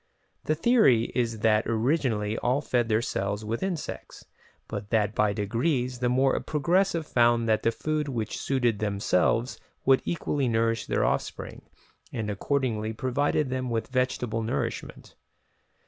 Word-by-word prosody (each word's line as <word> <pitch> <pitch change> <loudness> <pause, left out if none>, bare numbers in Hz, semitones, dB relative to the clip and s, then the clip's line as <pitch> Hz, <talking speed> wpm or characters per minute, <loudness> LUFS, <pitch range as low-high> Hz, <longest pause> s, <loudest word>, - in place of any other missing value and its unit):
The 155 - +1
theory 165 - +4
is 115 -3 -1
that 110 -1 +3
originally 115 -3 0
all 125 +3 +1
fed 120 -5 0
their 110 +1 +2
cells 100 +1 -2
with 115 +2 -3
insects, 185 -5 -5 0.4
but 105 -1 -6
that 105 -2 +1
by 105 0 +2
degrees 120 +5 -1
the 125 -1 +1
more 130 +2 +2
progressive 170 +2 +1
found 120 -3 +3
that 110 -1 +2
the 115 - +2
food 155 +5 -2
which 115 -5 -3
suited 120 -6 0
themselves 105 +3 +1 0.3
would 135 0 +5
equally 145 -5 -1
nourish 115 -1 0
their - - +1
offspring, - - -3 0.5
and 110 -2 -3
accordingly 110 -1 -1
provided 130 +4 0
them 130 -1 -2
with 115 -1 -2
vegetable 125 -3 -1
nourishment. 110 +1 -4
120 Hz, 140 wpm, -27 LUFS, 110-135 Hz, 0.5 s, would